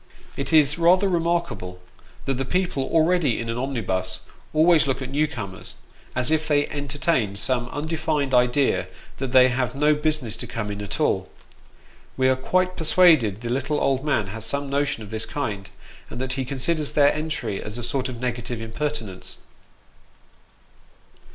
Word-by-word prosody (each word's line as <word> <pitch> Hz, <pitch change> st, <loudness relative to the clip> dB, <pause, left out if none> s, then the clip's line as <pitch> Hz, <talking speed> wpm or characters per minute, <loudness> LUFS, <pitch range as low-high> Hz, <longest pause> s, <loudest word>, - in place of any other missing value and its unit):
It 140 Hz, -, -3 dB
is 150 Hz, 0 st, +4 dB
rather 180 Hz, +4 st, +5 dB
remarkable, 165 Hz, -, -1 dB, 0.5 s
that 135 Hz, -1 st, -1 dB
the -, -, +1 dB
people 180 Hz, -1 st, -1 dB
already 165 Hz, -5 st, +3 dB
in 115 Hz, 0 st, -4 dB
an 115 Hz, -, -4 dB
omnibus, 95 Hz, -8 st, -2 dB, 0.3 s
always 155 Hz, -1 st, +4 dB
look 135 Hz, -, 0 dB
at 130 Hz, -1 st, -6 dB
new 150 Hz, +2 st, +2 dB
comers, 100 Hz, -9 st, -7 dB, 0.4 s
as 125 Hz, +2 st, 0 dB
if 160 Hz, -1 st, +1 dB
they 145 Hz, -1 st, +2 dB
entertained 140 Hz, -, -1 dB
some 120 Hz, +2 st, 0 dB
undefined 155 Hz, -1 st, -2 dB
idea 125 Hz, +3 st, +3 dB, 0.3 s
that 135 Hz, -2 st, -3 dB
they 130 Hz, 0 st, +7 dB
have 125 Hz, 0 st, -1 dB
no 150 Hz, +2 st, +4 dB
business 150 Hz, -7 st, -1 dB
to 120 Hz, -, -4 dB
come 115 Hz, -3 st, -4 dB
in 100 Hz, 0 st, -5 dB
at 100 Hz, -, -4 dB
all. -, -, +1 dB, 0.9 s
We 130 Hz, 0 st, +3 dB
are 130 Hz, -, +4 dB
quite 185 Hz, +7 st, 0 dB
persuaded 155 Hz, -, +4 dB
the 120 Hz, -, -4 dB
little 140 Hz, +4 st, -1 dB
old 135 Hz, -1 st, +1 dB
man 140 Hz, -8 st, +1 dB
has 110 Hz, 0 st, -4 dB
some 140 Hz, +3 st, -2 dB
notion 140 Hz, -5 st, 0 dB
of 100 Hz, -, -11 dB
this 110 Hz, 0 st, -3 dB
kind, 110 Hz, -7 st, -4 dB, 0.4 s
and 120 Hz, -, -7 dB
that 130 Hz, 0 st, -2 dB
he 130 Hz, 0 st, -2 dB
considers 145 Hz, +4 st, -1 dB
their 145 Hz, -1 st, +5 dB
entry 145 Hz, -10 st, -3 dB
as 105 Hz, +2 st, -5 dB
a 120 Hz, -, -5 dB
sort 130 Hz, +2 st, -1 dB
of 120 Hz, -2 st, -7 dB
negative 120 Hz, -1 st, -3 dB
impertinence. 115 Hz, -4 st, -5 dB
135 Hz, 165 wpm, -24 LUFS, 115-150 Hz, 0.9 s, they